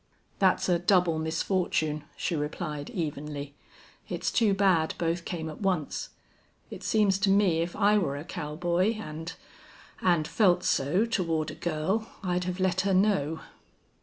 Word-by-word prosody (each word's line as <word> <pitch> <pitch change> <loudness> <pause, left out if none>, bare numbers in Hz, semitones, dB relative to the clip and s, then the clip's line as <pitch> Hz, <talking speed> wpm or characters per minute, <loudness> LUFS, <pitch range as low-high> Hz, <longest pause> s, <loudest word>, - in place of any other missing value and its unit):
"That's 190 -2 +3
a 175 -2 +3
double 175 -3 +3
misfortune," 160 -2 -1
she 175 - -1
replied, 150 0 -4
evenly. 145 -4 -4 0.6
"It's - - -2
too 215 -4 +3
bad 185 -5 +2
both 170 0 -1
came 165 -3 -4
at 155 +4 -8
once. 180 -7 -1 0.6
It - - -7
seems 205 -3 +2
to 195 0 +2
me 195 -4 +4
if 170 +1 -3
I 210 0 +4
were 140 -7 -1
a 145 - -6
cowboy 175 +5 -1
and 165 -5 -6 0.7
and 170 -4 +2
felt 180 -4 +3
so 165 +11 +2
toward 165 -8 -1
a - - -8
girl, 175 +9 -1
I'd 180 -1 0
have 180 0 -3
let 185 -1 +2
her 195 0 +1
know." 175 -6 +2
175 Hz, 150 wpm, -28 LUFS, 155-195 Hz, 0.7 s, me